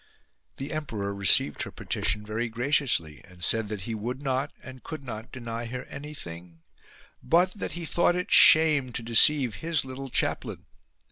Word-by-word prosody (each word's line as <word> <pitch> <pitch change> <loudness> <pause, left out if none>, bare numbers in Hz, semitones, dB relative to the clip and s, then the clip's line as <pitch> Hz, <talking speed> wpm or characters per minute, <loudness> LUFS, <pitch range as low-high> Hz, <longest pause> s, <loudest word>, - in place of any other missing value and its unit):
The 135 +2 -6
emperor 110 -10 -4
received 100 -7 +3
her - - -4
petition 105 0 -3
very 110 +3 -3
graciously 120 - 0
and 90 -2 -13
said 115 +1 +2
that 105 -3 -5
he 115 +4 -5
would 120 +4 -4
not 135 0 -2
and 130 -1 -11
could 155 -3 -8
not 110 -3 -8
deny 120 -2 -6
her 125 +2 -6
anything; 85 - -10 0.6
but 180 +3 +2
that 210 - -5
he 175 -1 -5
thought 175 +3 +1
it 180 0 -4
shame 150 -5 +6
to 115 - -3
deceive 120 +2 +5
his 160 -4 -1
little 130 +1 -7
chaplain. - - -2
125 Hz, 160 wpm, -26 LUFS, 110-150 Hz, 0.6 s, shame